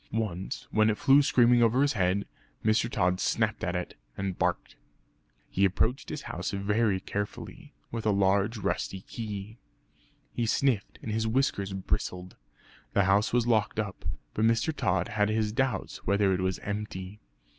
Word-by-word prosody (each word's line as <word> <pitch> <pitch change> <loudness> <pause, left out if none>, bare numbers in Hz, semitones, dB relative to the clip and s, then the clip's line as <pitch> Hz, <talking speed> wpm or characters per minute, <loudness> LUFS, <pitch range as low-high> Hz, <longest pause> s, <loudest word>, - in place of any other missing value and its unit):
Once 100 -5 -3
when 110 0 +4
it 105 - 0
flew 140 +1 +6
screaming 120 -4 +4
over 120 +4 +4
his 145 - +2
head 95 -1 +1 0.4
Mr. 110 +1 +3
Tod 90 -7 +1
snapped - - 0
at - - -1
it, - - -4 0.2
and 95 -2 -2
barked. - - -1 0.7
He 95 - 0
approached 110 +7 +1
his - - -5
house - - -4
very 100 0 +1
carefully, 145 - -6 0.2
with 115 -2 -3
a - - +4
large 100 +3 +2
rusty 95 -2 -2
key. 105 0 -7 0.7
He 120 -1 -1
sniffed 120 -2 +1
and 110 - -4
his 110 +1 0
whiskers 110 -5 0
bristled. 90 -1 -3 0.6
The 100 - +4
house 100 +3 +3
was 120 -1 +2
locked 110 -2 +1
up, 105 -3 -4 0.3
but 110 - -1
Mr. 115 +7 +2
Tod 100 -9 0
had 105 0 +1
his 110 -1 0
doubts 130 +3 -1
whether 100 0 +2
it 95 - -1
was 95 0 0
empty. 100 -1 -5
105 Hz, 160 wpm, -28 LUFS, 95-115 Hz, 0.7 s, flew